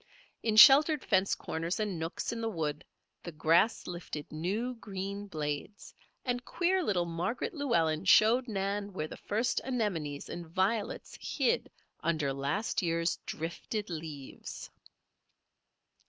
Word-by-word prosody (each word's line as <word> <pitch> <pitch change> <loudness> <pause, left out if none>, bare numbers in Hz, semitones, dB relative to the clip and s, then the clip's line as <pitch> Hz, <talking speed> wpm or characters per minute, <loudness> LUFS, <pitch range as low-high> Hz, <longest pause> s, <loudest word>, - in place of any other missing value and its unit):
In 220 -2 0
sheltered 290 +5 +8
fence 195 -1 +3
corners 165 +5 -3
and 205 -6 -2
nooks 165 +1 -3
in 230 -1 -4
the 225 - -1
wood, 155 -6 -3 0.4
the 175 - -7
grass 165 +7 +3
lifted 170 -4 -6
new, 200 +11 -2
green 200 -2 -5
blades, 150 +4 -5 0.3
and 245 -1 -1
queer 365 +5 +1
little 180 - +1
Margaret 175 - -2
Llewellen 170 - +1
showed 225 +7 +6
Nan 200 -1 -2
where 155 -4 -3
the - - -8
first 230 +4 -1
anemones 185 - -2
and 175 -1 -6
violets 195 +5 -1
hid 475 +1 0 0.3
under 155 -4 0
last 140 +11 -1
year's 170 -1 0
drifted 175 +5 -4
leaves. 155 -4 -7
190 Hz, 125 wpm, -31 LUFS, 165-225 Hz, 0.4 s, sheltered